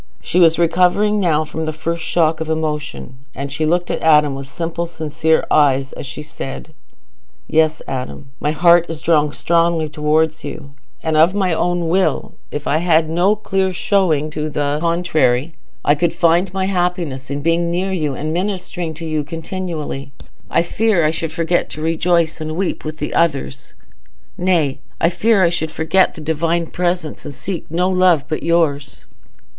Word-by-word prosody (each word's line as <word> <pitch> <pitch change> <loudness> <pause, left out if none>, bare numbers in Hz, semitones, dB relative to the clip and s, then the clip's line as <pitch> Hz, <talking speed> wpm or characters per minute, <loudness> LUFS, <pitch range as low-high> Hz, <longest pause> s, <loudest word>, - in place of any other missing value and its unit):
She 180 - 0
was 165 -2 +5
recovering 180 +5 +3
now 155 -5 +2
from 160 +1 -4
the 155 - -1
first 165 +2 -3
shock 160 -2 +1
of 160 - -3
emotion, 150 -4 -3 0.2
and 140 +1 -5
she 155 +1 0
looked 175 +2 +1
at - - -2
Adam 150 -3 +4
with 135 0 -7
simple 170 +3 -4
sincere 160 -1 0
eyes 135 -2 +3
as - - -7
she 130 +3 -7
said, 150 0 -8 0.7
"Yes, 155 0 +2
Adam, 135 +1 -6
my 150 - -1
heart 170 +2 +4
is 165 -2 -5
drawn 150 -3 +2
strongly 165 0 +1
towards 155 +1 0
you; 140 -3 -8 0.3
and 160 -1 0
of 165 +5 +5
my 190 -4 +1
own 175 +1 0
will, 185 +3 0 0.2
if 145 - -5
I 150 - +1
had 160 -1 +2
no 180 +5 +3
clear 195 -2 -1
showing 175 -5 +1
to 150 0 -3
the 145 0 -1
contrary, 165 -5 +1 0.3
I 145 - +5
could 165 +3 0
find 170 +2 +2
my 190 0 -1
happiness 175 -8 -2
in 140 0 -4
being 170 +1 +1
near 180 +3 -1
you 150 -6 -1
and 155 +4 -3
ministering 180 -3 -3
to 165 +2 -7
you 155 -2 -1
continually. 160 -3 -5 0.4
I - - +2
fear 200 -1 +1
I 155 - +3
should 165 0 -4
forget 170 +1 0
to 155 - -7
rejoice 165 0 +1
and 155 0 -4
weep 190 +2 -2
with 155 -1 -6
others; 140 -5 -1 0.6
nay, 170 -7 +1 0.2
I 165 - +3
fear 200 +3 +2
I 170 - +5
should 160 -2 -2
forget 160 +4 +2
the - - -9
Divine 165 +2 0
presence, 175 -1 -2
and 145 - -8
seek 180 +2 -5
no 175 +3 +1
love 180 -5 +3
but 155 - -3
yours." 160 -4 0
160 Hz, 170 wpm, -18 LUFS, 150-175 Hz, 0.7 s, was